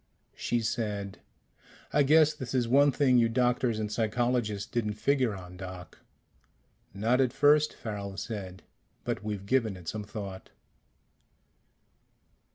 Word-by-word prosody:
She 120 -1 -1
said, 105 -3 -3 0.7
"I 150 - +4
guess 155 +2 +5
this 130 -4 -6
is 125 -2 +2
one 140 +4 +5
thing 130 -2 +3
you 115 -1 +3
doctors 120 -1 +1
and 105 -1 -3
psychologists 115 -2 0
didn't 105 -3 -2
figure 130 -1 +1
on, 90 -1 -10
Doc." 90 -2 -9 0.9
"Not 115 +7 +1
at 130 -2 +2
first," 150 +3 +4
Farrel 100 -3 -6
said. 95 -5 -6 0.4
"But 95 - -3
we've 105 -2 -4
given 110 -4 +1
it 90 -2 -13
some 110 +4 -3
thought." 100 -2 -7
110 Hz, 130 wpm, -29 LUFS, 100-125 Hz, 0.9 s, guess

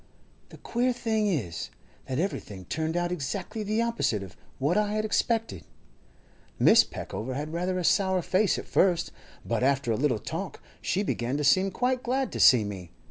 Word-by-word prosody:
The - - -13
queer 245 +2 0
thing 220 -3 0
is, 115 - -2 0.4
that 130 - -2
everything 105 - -3
turned 160 - -2
out 175 0 0
exactly 180 +7 -4
the 215 +2 0
opposite 230 - 0
of 95 -2 -11 0.2
what 145 +6 +1
I 210 0 +1
had 215 0 0
expected. 225 - 0 1.0
Mrs. - - +6
Peckover 130 +4 -5
had 150 +3 -4
rather 180 +2 -1
a 180 - -2
sour 190 0 +2
face 190 +4 +2
at - - -6
first, 180 -3 +2 0.3
but - - -1
after 135 -2 +2
a - - +2
little 135 -4 +1
talk - - -5 0.2
she 200 - 0
began 125 -7 -1
to 150 - -1
seem 185 +8 +4
quite 250 +5 0
glad 260 +2 -1
to - - -5
see 125 -5 +7
me. 95 -4 -6
175 Hz, 180 wpm, -27 LUFS, 130-215 Hz, 1.0 s, see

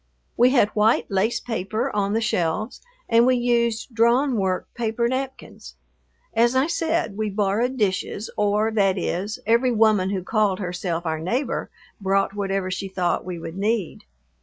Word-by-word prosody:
We 245 +1 +5
had 245 -6 +3
white 215 +1 +2
lace 195 +4 +1
paper 220 -1 -3
on 200 0 0
the 225 - +1
shelves 215 0 -1 0.3
and 230 0 +5
we 255 - +4
used 235 -1 0
drawn 240 +4 +3
work 190 -3 0
paper 235 0 -1
napkins. 260 - -5 0.6
As 235 +2 +3
I 260 +1 +4
said, 330 -8 -1
we 215 -1 -1
borrowed 210 +6 0
dishes, 205 0 -1
or, 210 +2 +1
that 195 -3 +2
is, 190 +4 -2
every 235 +3 +3
woman 215 -4 +3
who 190 -2 -2
called 210 -2 +1
herself 180 -2 -3
our 160 -1 -1
neighbor 245 - -2 0.3
brought 195 0 +1
whatever 195 -2 -2
she 195 +1 -3
thought 185 -2 -1
we 180 -1 -5
would 165 +2 -7
need. 210 - -1
215 Hz, 160 wpm, -23 LUFS, 190-235 Hz, 0.6 s, We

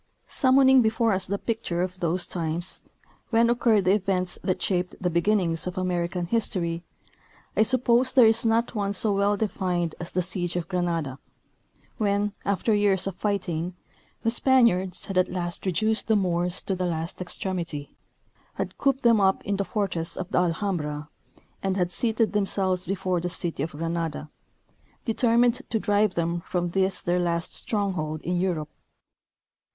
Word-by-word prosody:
Summoning 265 -1 +5
before 225 0 +2
us 190 -1 -2
the 200 +1 -1
picture 200 -6 -2
of 185 0 -5
those 175 +1 +1
times, 170 +1 -1 0.5
when 230 0 +4
occurred 230 -4 +3
the 185 - +5
events 185 -3 0
that 185 - 0
shaped 180 -2 -1
the 180 -1 -1
beginnings 170 -2 +1
of 180 +1 -5
American 180 -1 -1
history, 170 -5 -1 0.7
I - - +3
suppose 250 +1 +3
there 255 -3 +6
is 225 +1 +3
not 230 +1 +1
one 200 -2 -1
so 205 +1 +1
well 200 +1 +2
defined 180 -5 -1
as 170 - -6
the 180 - 0
siege 175 -1 0
of 175 -2 -2
Granada, 170 -7 -2 0.8
when, 205 -1 +1
after 200 +3 +1
years 205 -3 +2
of 195 - -2
fighting, 180 -4 -2 0.5
the 230 - +2
Spaniards 235 -8 +2
had 195 -2 0
at 185 - +2
last 175 +1 -4
reduced 215 +5 0
the 220 - +3
Moors 180 -2 0
to 195 - -1
the 185 -1 -1
last 165 +1 -4
extremity, 175 -5 -5 0.6
had - - -5
cooped 275 -1 +1
them 230 -3 +5
up 190 0 +2
in 200 -1 -1
the 200 - 0
fortress 195 -6 -2
of 180 - -5
the - - +3
Alhambra, 165 -5 -2 0.5
and 195 0 -1
had 180 -1 0
seated 225 +1 0
them 205 -2 +1
selves 185 -2 0
before 185 -2 -1
the 175 - -2
city 170 -4 -3
of 155 +2 -3
Granada, 165 -1 -3 0.7
determined 235 +2 +3
to 220 - 0
drive 205 -1 +2
them 170 0 -1
from 175 -1 -1
this 190 +1 0
their 175 +1 +1
last 170 -1 -1
stronghold 180 -8 -2
in 180 +1 -1
Europe. 160 -5 -2
185 Hz, 165 wpm, -26 LUFS, 175-210 Hz, 0.8 s, there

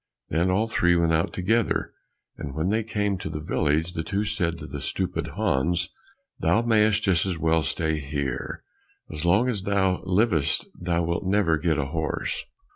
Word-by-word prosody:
Then 85 +4 +1
all 95 +4 +2
three 85 -6 +2
went 85 -1 +2
out 80 +1 +1
together, 110 +5 0 0.4
and 70 -1 -7
when 80 +4 0
they 110 +2 +1
came 105 -3 -1
to 95 - -5
the 75 - -4
village, 80 +2 0
the 80 - -2
two 100 +5 -1
said 95 -5 -1
to - - -7
stupid 90 -1 -2
Hans, 85 +6 +1 0.5
"Thou 115 - +2
mayst 110 -2 +3
just 90 -5 +3
as 90 -3 -2
well 80 +1 +2
stay 80 +1 -1
here, 70 -2 -4 0.5
as 75 +2 -4
long 100 +8 +4
as 110 -6 0
thou 95 -2 +1
livest 90 -6 +2
thou 85 -1 -1
wilt 85 +2 -2
never 95 -4 +3
get 80 -3 +1
a 75 - 0
horse." 75 +1 -2
85 Hz, 175 wpm, -25 LUFS, 80-100 Hz, 0.5 s, long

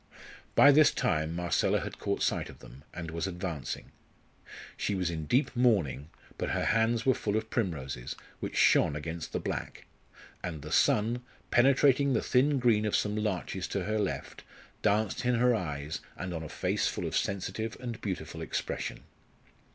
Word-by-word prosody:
By 145 - +8
this 150 +1 +7
time 80 +1 0
Marcella 85 0 +1
had - - -6
caught - - -1
sight - - 0
of - - -12
them, 65 +3 -14
and 85 -2 -6
was 85 +3 -2
advancing. 90 -5 -5 0.8
She 100 - -1
was 90 -3 0
in 80 -2 -4
deep 130 - +2
mourning, 95 - +2 0.3
but - - -1
her - - 0
hands 115 0 +2
were 130 - +5
full 105 -2 -1
of 110 0 -4
primroses, 70 - -2 0.2
which - - -5
shone 70 - +5
against 80 +2 -5
the - - -1
black; - - -5 0.6
and 80 -5 -5
the 75 - -7
sun, 115 +4 +3 0.3
penetrating 135 +2 +4
the 115 - +1
thin 140 +3 +3
green 115 -4 +3
of 105 - +1
some 105 0 +1
larches 105 -6 -2
to - - -2
her 110 +1 -1
left, 105 - -3 0.4
danced 105 +3 +1
in 125 0 +2
her 125 +1 +4
eyes 75 -7 -3 0.2
and 90 -1 -4
on 80 - -4
a 80 - -7
face - - 0
full - - -3
of - - -3
sensitive 100 +3 -2
and 120 -3 -6
beautiful 95 -3 -4
expression. - - -3
105 Hz, 170 wpm, -30 LUFS, 80-120 Hz, 0.8 s, By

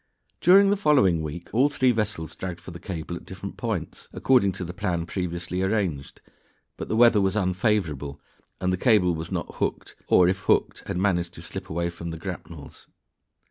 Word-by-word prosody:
During 195 +3 +6
the 205 - +2
following 130 - +3
week 80 +3 -7
all 130 +6 +4
three 130 -3 +2
vessels 105 -8 -2
dragged 90 -2 -5
for 90 +1 -10
the 85 - -9
cable 85 -3 -5
at - - -9
different 95 +1 -8
points, 100 -10 -4
according 125 -7 +3
to 90 0 -5
the 90 - -6
plan 90 -3 -2
previously 90 0 -3
arranged, 95 -8 -2 0.5
but - - -7
the - - 0
weather 115 -2 +6
was 95 0 +1
unfavorable, 90 - 0 0.4
and 90 0 0
the - - 0
cable 95 -4 +4
was 80 0 -5
not - - -4
hooked - - -3
or, 90 - +5
if 95 +1 +1
hooked, 90 - 0
had - - -2
managed 90 -3 0
to - - -10
slip - - -7
away 85 +1 -1
from 85 0 -7
the 80 - -5
grapnels. 85 -4 -9
90 Hz, 185 wpm, -25 LUFS, 85-105 Hz, 0.5 s, During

